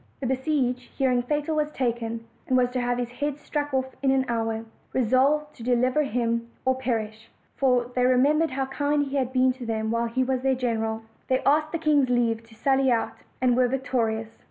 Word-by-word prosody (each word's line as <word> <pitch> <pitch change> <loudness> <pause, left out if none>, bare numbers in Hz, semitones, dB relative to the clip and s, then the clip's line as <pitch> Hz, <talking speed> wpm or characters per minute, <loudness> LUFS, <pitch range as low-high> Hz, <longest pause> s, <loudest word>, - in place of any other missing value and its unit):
The 270 - -4
besieged, 260 -1 0 0.2
hearing 255 -3 +2
Fatal 295 +5 -1
was 300 -1 +1
taken, 230 -4 -2 0.2
and 255 - +3
was 250 -1 +2
to 250 0 -1
have 245 0 0
his 245 -1 -3
head 290 +2 -3
struck 295 0 -3
off 260 -1 -2
in 275 - +2
an 265 0 +3
hour, 225 -1 -2 0.3
resolved 270 +5 +2
to 230 - -9
deliver 250 +4 +2
him 235 -3 -1 0.2
or 260 - +4
perish, 225 -4 -3 0.3
for 250 -2 +2
they 250 - +2
remembered 280 +6 +3
how 270 +1 -2
kind 290 +2 0
he 280 0 -3
had 260 -2 0
been 255 0 +3
to 255 0 -10
them 220 -1 -1
while 230 0 0
he 255 +3 0
was 260 0 -1
their 265 0 +2
general: 225 -3 -2 0.2
they 260 0 +1
asked 305 +2 +3
the 335 - -1
king's 295 -5 +2
leave 235 -2 +1
to 225 -1 -18
sally 265 +3 +2
out, 230 -1 0 0.3
and 250 -2 +3
were 250 0 +4
victorious. 230 -4 -2
255 Hz, 205 wpm, -25 LUFS, 235-270 Hz, 0.3 s, or